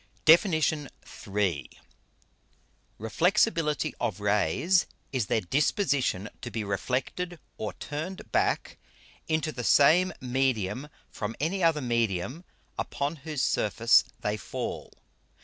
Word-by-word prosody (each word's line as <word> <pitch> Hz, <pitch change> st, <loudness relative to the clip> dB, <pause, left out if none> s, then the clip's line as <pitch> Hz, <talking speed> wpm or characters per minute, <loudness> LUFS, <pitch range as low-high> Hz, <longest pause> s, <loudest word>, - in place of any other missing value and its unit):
DEFIN. 170 Hz, +5 st, +7 dB, 0.8 s
III. 95 Hz, -7 st, 0 dB, 1.3 s
_Reflexibility 160 Hz, -, +1 dB
of 100 Hz, -3 st, -1 dB
Rays, 105 Hz, -, +2 dB, 0.3 s
is 125 Hz, -6 st, 0 dB
their 110 Hz, -, +1 dB
Disposition 135 Hz, -, +1 dB
to 120 Hz, -, -5 dB
be 115 Hz, -2 st, -3 dB
reflected 130 Hz, -, -2 dB, 0.2 s
or 110 Hz, -, -3 dB
turned 160 Hz, +5 st, -6 dB
back -, -, 0 dB, 0.5 s
into 155 Hz, -1 st, 0 dB
the 125 Hz, -, -5 dB
same 175 Hz, +9 st, +5 dB
Medium 130 Hz, -1 st, -1 dB, 0.2 s
from 110 Hz, +2 st, -4 dB
any 175 Hz, +6 st, -1 dB
other 165 Hz, -3 st, +3 dB
Medium 115 Hz, -, -1 dB, 0.4 s
upon 145 Hz, +3 st, -2 dB
whose 150 Hz, -1 st, -3 dB
Surface 115 Hz, +3 st, +4 dB, 0.2 s
they 105 Hz, +1 st, -1 dB
fall. -, -, -5 dB
130 Hz, 105 wpm, -28 LUFS, 105-160 Hz, 1.3 s, DEFIN